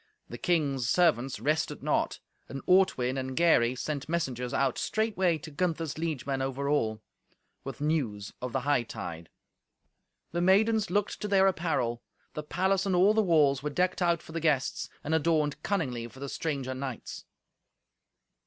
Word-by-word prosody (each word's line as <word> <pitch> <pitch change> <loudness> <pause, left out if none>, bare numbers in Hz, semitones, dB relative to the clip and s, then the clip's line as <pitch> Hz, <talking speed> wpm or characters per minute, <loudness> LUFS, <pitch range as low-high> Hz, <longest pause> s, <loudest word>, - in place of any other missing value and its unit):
The - - -8
king's 140 - +1
servants 140 -7 +2
rested 155 +2 -1
not. - - 0 0.3
And 135 - -6
Ortwin 135 -9 +3
and 130 0 -5
Gary 130 -8 +4
sent 145 +2 -4
messengers 130 -7 -2
out 135 -2 0
straightway 195 -6 +1
to 155 +1 -10
Gunther's 165 -1 -2
liegemen 140 -4 -2
over 135 +1 -2
all, 110 -7 0 0.6
with 135 +1 -7
news 125 -10 -1
of 125 0 -4
the 135 - -1
hightide. 115 - -2 1.0
The 175 +2 -1
maidens 210 +3 +3
looked 205 +2 -1
to 210 - -2
their 195 -1 +4
apparel. 160 -10 0 0.3
The 150 - -4
palace 190 +5 0
and 190 - +1
all 190 +4 +5
the 220 - +3
walls 150 -8 +3
were 150 - -2
decked 180 +5 0
out 170 -2 +2
for - - -12
the 165 - -3
guests, 150 -5 0
and 155 - -2
adorned 155 -2 +1
cunningly 130 - -2
for 130 - -15
the 140 0 -5
stranger 140 -5 -3
knights. 130 -2 -6
150 Hz, 155 wpm, -29 LUFS, 130-175 Hz, 1.0 s, all